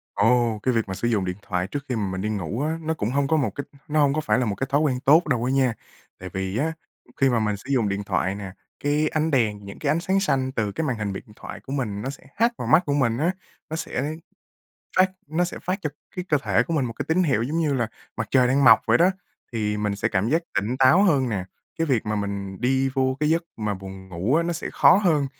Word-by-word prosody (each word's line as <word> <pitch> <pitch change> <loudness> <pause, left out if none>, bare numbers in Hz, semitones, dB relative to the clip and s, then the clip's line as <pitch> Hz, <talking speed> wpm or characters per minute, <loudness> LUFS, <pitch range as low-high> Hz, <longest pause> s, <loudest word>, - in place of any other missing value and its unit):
Ồ! 115 +1 +3
Cái 130 - +2
việc 115 -3 0
mà 95 - -4
sử 120 - -2
dụng 105 -5 +1
điện 90 +1 -3
thoại 90 -2 -2
trước 145 +5 -5
khi 125 - 0
mà 105 -3 -1
mình 95 - -3
đi 105 - -1
ngủ 105 - -3
á, 160 +2 -1
nó 160 +1 -1
cũng 110 -8 -2
hông 140 0 +1
có 160 +2 +2
một 130 -8 +1
cái 140 - -3 0.2
nó 155 +1 +1
hông 140 -2 +4
có 155 - 0
phải 150 - +1
là 125 - +1
một 100 -3 -1
cái 135 - -3
thói 145 +2 +2
quen 130 -5 +1
tốt 155 +6 +5
đâu 125 -5 +1
á 125 - 0
nha. 130 -3 +2 0.5
Tại 95 - -7
vì 95 +2 -2
á, 160 +6 0 0.5
khi 135 - +5
mà 120 -2 +2
mình 105 -2 0
sử 115 - -13
dụng 115 -6 +2
điện 100 +1 -2
thoại 95 -1 -1
nè, 100 -2 -7 0.3
cái 150 +2 +2
ánh 155 +1 0
đèn, 105 -6 +1
những 100 - -9
cái 145 - -1
ánh 155 +3 +2
sáng 190 +3 +1
xanh 135 -9 0
từ 110 -5 -1
cái 160 +9 -2
màn 125 - -1
hình 105 -2 -3
điện 95 - -6
thoại - - -9
của 135 - -11
mình, 110 -8 -2
nó 130 - -3
sẽ 140 - -9
hắt 230 +3 +3
vào - - -4
mắt 160 +4 +5
của 145 - 0
mình 120 -5 +1
á. 165 +6 +2 0.4
Nó 160 - -3
sẽ 150 -1 -3 0.8
phát 185 0 +5 0.2
nó 160 +4 +1
sẽ 175 - -5
phát 185 +2 -1
cho 150 - -1 0.3
cái 180 - -3
cơ 150 - +4
thể - - +3
của - - -5
mình 140 - +1
một 115 - -3
cái - - -5
tín 170 +3 +3
hiệu, 130 -9 +2
giống 150 +7 -1
như 155 -3 +1
là 120 -4 0 0.3
mặt 110 - -2
trời 130 -2 +5
đang 135 +3 +3
mọc 115 -3 +8
vậy 115 - +4
đó, 175 +3 +5 0.4
thì 105 -2 -1
mình 105 -1 -1
sẽ 110 +2 0
cảm 100 0 0
giác 160 +6 +2
tỉnh 110 +6 0
táo 135 +8 +6
hơn 145 -10 +3
nè. 100 -5 -2 0.3
Cái 165 - +1
việc 125 -7 +1
mà 105 - -1
mình 100 -1 -4
đi 130 +2 +2
vô 130 -1 +1
cái 150 +1 +2
giấc 165 +1 +2
mà 105 -2 -2
buồn 95 0 -9
ngủ 95 +9 -1
á, 165 - +4
nó 175 - -1
sẽ 170 - -4
khó - - +6
hơn. 165 -8 +2
130 Hz, 280 wpm, -24 LUFS, 105-150 Hz, 0.8 s, mọc